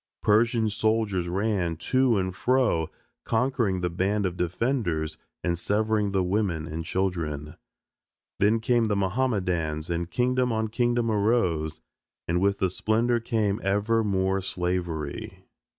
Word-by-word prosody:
Persian 115 +1 +3
soldiers 105 -4 0
ran 95 -3 0
to 130 +4 +2
and 95 -1 -1
fro 120 -10 +2 0.3
conquering 115 -5 0
the 90 - 0
band 100 +4 0
of 90 -1 -2
defenders 90 - -1 0.2
and 85 -1 +1
severing 105 +3 0
the 95 -1 +1
woman 90 -4 0
and 80 +1 -5
children. 80 -5 -2 0.9
Then 110 +3 +3
came 120 0 +2
the 105 -2 0
Mohammedans 90 -7 -1
and 85 0 -2
kingdom 125 +1 +1
on 110 -1 -1
kingdom 120 0 +1
arose, 95 -8 +1 0.5
and 85 +2 +1
with 100 0 +2
the 95 -2 0
splendor 115 +5 +1
came 110 -3 0
ever 105 +4 +1
more 95 -1 +1
slavery. 90 -5 -3
100 Hz, 130 wpm, -26 LUFS, 90-115 Hz, 0.9 s, Persian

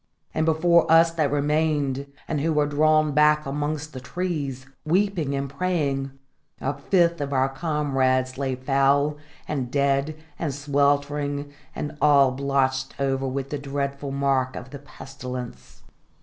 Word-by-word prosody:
And 155 +1 0
before 165 +1 +3
us 165 +1 +6
that 155 -4 0
remained, 145 -2 0 0.2
and 150 -3 -1
who 160 +2 +1
were 150 -1 +2
drawn 155 +1 +3
back 150 +1 +4
amongst 150 +2 -3
the 130 - -6
trees, 140 -2 -4 0.2
weeping 170 -4 +1
and 140 0 -2
praying, 140 -3 -1 0.5
a 135 - -1
fifth 170 +3 +1
of 140 -1 -3
our 130 -1 +2
comrades 135 -3 0
lay 135 -1 -2
foul, 140 +3 +2 0.3
and 135 -5 -2
dead, 140 +2 +1 0.2
and 150 -6 -2
sweltering, 145 0 0 0.2
and 150 - -4
all 140 -3 +5
blotched 135 0 -1
over 135 -1 0
with 135 +1 -4
the 145 - -2
dreadful 140 0 -3
mark 135 -2 0
of 125 - -8
the 140 - -8
pestilence. 130 -3 -9
140 Hz, 140 wpm, -24 LUFS, 135-150 Hz, 0.5 s, us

